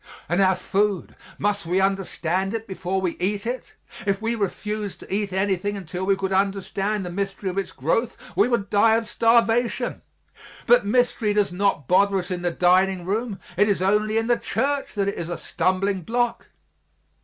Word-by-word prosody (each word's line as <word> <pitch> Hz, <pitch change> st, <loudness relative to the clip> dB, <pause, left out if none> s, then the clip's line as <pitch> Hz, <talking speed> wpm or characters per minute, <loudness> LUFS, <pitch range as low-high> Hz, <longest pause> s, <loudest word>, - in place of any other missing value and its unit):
And 175 Hz, +5 st, +1 dB
our 190 Hz, -1 st, +4 dB
food, 200 Hz, 0 st, -1 dB, 0.2 s
must 205 Hz, -3 st, -1 dB
we 180 Hz, +3 st, +2 dB
understand 195 Hz, 0 st, 0 dB
it 225 Hz, 0 st, -4 dB
before 190 Hz, -1 st, -2 dB
we 185 Hz, -3 st, -1 dB
eat 200 Hz, +3 st, -1 dB
it? 245 Hz, +1 st, -5 dB, 0.3 s
If 195 Hz, -1 st, +1 dB
we 225 Hz, +1 st, -1 dB
refused 210 Hz, -1 st, -3 dB
to -, -, -8 dB
eat 200 Hz, -1 st, -1 dB
anything 195 Hz, +1 st, 0 dB
until 180 Hz, 0 st, -5 dB
we 195 Hz, -, +4 dB
could 195 Hz, 0 st, -2 dB
understand 195 Hz, +1 st, 0 dB
the 175 Hz, -, -5 dB
mystery 195 Hz, +1 st, -3 dB
of 185 Hz, -, -8 dB
its 195 Hz, -, -4 dB
growth, 220 Hz, -, -1 dB, 0.2 s
we 200 Hz, +5 st, +4 dB
would 235 Hz, -5 st, -1 dB
die 220 Hz, +2 st, +5 dB
of 225 Hz, -1 st, -1 dB
starvation. 230 Hz, +1 st, +2 dB, 0.6 s
But 240 Hz, -3 st, +5 dB
mystery 235 Hz, -2 st, +2 dB
does 205 Hz, -3 st, +2 dB
not 185 Hz, -8 st, 0 dB
bother 200 Hz, +2 st, +4 dB
us 185 Hz, 0 st, -4 dB
in 180 Hz, -1 st, -2 dB
the 175 Hz, -, +1 dB
dining 180 Hz, +1 st, +2 dB
room; 210 Hz, +2 st, -2 dB, 0.2 s
it 205 Hz, +2 st, +4 dB
is 200 Hz, -, +1 dB
only 210 Hz, +3 st, +2 dB
in 225 Hz, -, +1 dB
the 240 Hz, 0 st, +2 dB
church 275 Hz, +3 st, -1 dB
that 200 Hz, -1 st, 0 dB
it 200 Hz, -, -2 dB
is 170 Hz, 0 st, -4 dB
a 175 Hz, -, -3 dB
stumbling 190 Hz, +1 st, 0 dB
block. 240 Hz, +5 st, -1 dB
200 Hz, 185 wpm, -24 LUFS, 190-215 Hz, 0.6 s, die